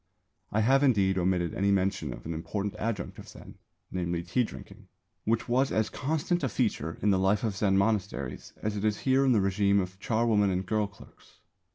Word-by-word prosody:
I 110 Hz, -, +2 dB
have, 135 Hz, +5 st, +4 dB
indeed, 100 Hz, -9 st, +3 dB
omitted 90 Hz, -2 st, 0 dB
any 100 Hz, +1 st, +1 dB
mention 95 Hz, -7 st, +1 dB
of -, -, -9 dB
an 85 Hz, -, -3 dB
important 100 Hz, +5 st, -3 dB
adjunct 110 Hz, -4 st, -3 dB
of -, -, -11 dB
Zen, -, -, -13 dB, 0.3 s
namely 85 Hz, -2 st, -2 dB
tea 90 Hz, +9 st, +1 dB
drinking, -, -, -10 dB, 0.4 s
which 115 Hz, +1 st, 0 dB
was 130 Hz, +3 st, +2 dB
as 110 Hz, -1 st, 0 dB
constant 160 Hz, +4 st, -1 dB
a 135 Hz, -, +1 dB
feature 80 Hz, -5 st, -1 dB
in 105 Hz, -, +4 dB
the 95 Hz, -, +3 dB
life 95 Hz, +2 st, +2 dB
of 110 Hz, -4 st, -1 dB
Zen 95 Hz, 0 st, +2 dB
monasteries 100 Hz, -, -1 dB
as 105 Hz, 0 st, -1 dB
it 100 Hz, -, -3 dB
is 105 Hz, -1 st, 0 dB
here 135 Hz, 0 st, +3 dB
in 135 Hz, -, +4 dB
the 115 Hz, -, +4 dB
régime 100 Hz, +1 st, +2 dB
of 95 Hz, 0 st, -4 dB
charwomen 110 Hz, -2 st, +2 dB
and 95 Hz, 0 st, -1 dB
girl 105 Hz, +1 st, 0 dB
clerks. 100 Hz, 0 st, -19 dB
100 Hz, 200 wpm, -29 LUFS, 95-110 Hz, 0.4 s, have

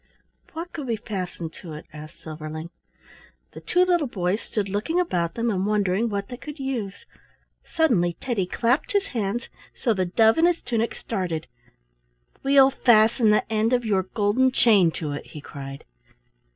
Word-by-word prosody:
"What 335 Hz, +2 st, -6 dB
could 290 Hz, -4 st, -5 dB
we 230 Hz, -, 0 dB
fasten 185 Hz, -6 st, -5 dB
to 165 Hz, -4 st, -8 dB
it?" 150 Hz, -, -9 dB
asked 155 Hz, +1 st, -11 dB
Silverling. 155 Hz, +1 st, -7 dB, 0.8 s
The -, -, -10 dB
two 360 Hz, +1 st, +3 dB
little 350 Hz, -5 st, +2 dB
boys 190 Hz, -2 st, -1 dB
stood 205 Hz, -3 st, -3 dB
looking 210 Hz, -, -1 dB
about 175 Hz, -, 0 dB
them 235 Hz, 0 st, 0 dB
and 190 Hz, -2 st, -1 dB
wondering 205 Hz, +1 st, +1 dB
what 200 Hz, -1 st, -3 dB
they 245 Hz, -, -6 dB
could 300 Hz, +3 st, -9 dB
use. 245 Hz, -8 st, -4 dB, 0.6 s
Suddenly 195 Hz, -, +1 dB
Teddy 220 Hz, -8 st, -1 dB
clapped 245 Hz, -, 0 dB
his 400 Hz, -1 st, +2 dB
hands 225 Hz, +1 st, -2 dB, 0.3 s
so 235 Hz, -, +1 dB
the 185 Hz, -3 st, 0 dB
dove 220 Hz, -, +4 dB
in 335 Hz, -, +6 dB
his 350 Hz, -1 st, 0 dB
tunic 230 Hz, -1 st, -1 dB
started. 175 Hz, -7 st, -3 dB, 1.0 s
"We'll 270 Hz, 0 st, +6 dB
fasten 225 Hz, -2 st, +4 dB
the 210 Hz, -, +3 dB
end 220 Hz, +3 st, +2 dB
of 245 Hz, -1 st, +1 dB
your 200 Hz, -3 st, +2 dB
golden 210 Hz, +6 st, +1 dB
chain 210 Hz, -9 st, +5 dB
to 150 Hz, -3 st, -4 dB
it," 145 Hz, -, -6 dB
he 150 Hz, -, -9 dB
cried. 140 Hz, -1 st, -9 dB
215 Hz, 165 wpm, -24 LUFS, 180-250 Hz, 1.0 s, in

